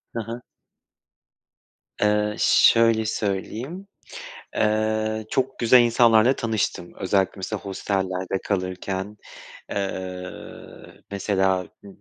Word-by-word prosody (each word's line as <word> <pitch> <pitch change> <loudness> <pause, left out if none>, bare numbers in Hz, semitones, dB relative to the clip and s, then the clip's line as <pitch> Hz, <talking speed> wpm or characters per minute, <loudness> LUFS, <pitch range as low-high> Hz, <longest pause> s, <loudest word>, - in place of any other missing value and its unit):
Ha 115 - -1
ha. 120 +2 -6 1.6
Eee, 105 0 +1
şöyle 115 -1 +5
söyleyeyim, 110 - -3 0.7
eee, 110 0 0
çok 130 0 -1
güzel 120 +1 +6
insanlarla 120 +1 +4
tanıştım. 110 -6 -2
Özellikle 95 0 +1
mesela 95 +2 -4
hostellerde 95 -1 -2
kalırken. 95 +1 -3 0.5
Eee, 95 -2 -4 0.8
mesela 95 -2 0 0.2
b 100 - -12
105 Hz, 85 wpm, -24 LUFS, 95-115 Hz, 1.6 s, güzel